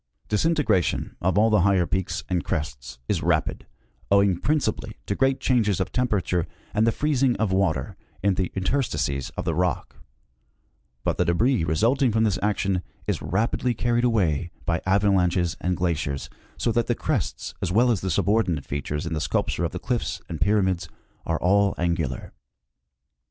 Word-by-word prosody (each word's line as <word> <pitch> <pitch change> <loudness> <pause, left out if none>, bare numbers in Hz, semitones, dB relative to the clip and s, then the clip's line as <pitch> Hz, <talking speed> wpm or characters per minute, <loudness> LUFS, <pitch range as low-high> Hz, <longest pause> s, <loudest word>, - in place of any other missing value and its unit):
Disintegration 110 - +1
of 95 +1 +1
all 110 +2 +4
the 105 -3 +4
higher 95 -1 +3
peaks 95 +1 -2
and 90 -2 0
crests 65 -6 -4
is - - 0
rapid, - - 0 0.4
owing 100 -3 +4
principally 115 -7 -1
to - - -1
great 135 +4 +1
changes 115 -8 +2
of 95 - -2
temperature 95 -8 0 0.3
and 110 +2 +2
the - - +5
freez 145 +1 0
ing 130 -3 +3
of 110 -3 0
water 95 -8 0 0.3
in 100 -1 +3
the 95 -1 -1
interstices 95 - -1
of - - -3
the 85 - 0
rock; 90 +1 -1 1.1
but - - 0
the - - +3
debris 110 +5 +2
result 110 - +1
ing 130 -4 +4
from 110 +1 +2
this 105 -4 +1
action 100 -3 0 0.2
is - - -1
rapidly 110 - 0
carried 120 +2 +1
away 90 - +1 0.2
by 85 -1 0
avalanches 95 -3 +2
and 90 0 0
glaciers, 80 -6 -2 0.3
so 115 - 0
that 115 0 +1
the 120 - +1
crests - - -2
as 90 - -1
well 120 +5 +4
as 105 -6 0
the 95 - -2
subordinate 90 -4 +1
features 75 +2 -3
in 85 - -3
the 75 - -2
sculpture - - 0
of - - -2
the - - -5
cliffs - - -2
and 80 -3 -6
pyramids 95 -5 +1 0.4
are 85 -1 0
all 100 +2 +3
angular. 85 -7 -2
95 Hz, 170 wpm, -25 LUFS, 85-110 Hz, 1.1 s, the